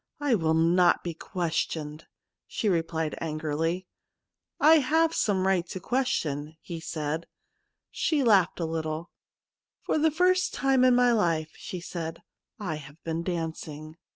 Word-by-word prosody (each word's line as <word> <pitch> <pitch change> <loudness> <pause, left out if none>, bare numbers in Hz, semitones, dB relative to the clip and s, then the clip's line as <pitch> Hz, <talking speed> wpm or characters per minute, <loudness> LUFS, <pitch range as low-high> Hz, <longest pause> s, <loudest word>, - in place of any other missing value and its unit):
I 290 -3 +1
will 160 -6 +2
not 175 +2 +4
be 170 - -3
questioned/ 160 -3 -3 0.4
she 220 - -2
replied 165 -4 0
angrily. 160 +3 -2 0.4
' - - -60
I - - +8
have 320 +4 +2
some 190 - +1
right 190 -2 +2
to 185 - -6
question/ 160 - -1
he 170 0 -7
said. 160 0 -3 0.6
She 300 -4 +1
laughed 195 -7 +4
a 170 - 0
little. 160 +1 -3 0.4
' - - -66
For - - +1
the 320 +1 +4
first 365 +4 +2
time 270 -1 +3
in 255 -1 +6
my 245 0 +5
life/ 165 -8 +1
she 185 - -7
said, 165 -2 -6 0.2
' - - -64
I 175 -7 -3
have 150 +1 -13
been 165 0 -2
dancing.' 160 -3 -5
170 Hz, 155 wpm, -27 LUFS, 160-225 Hz, 0.6 s, I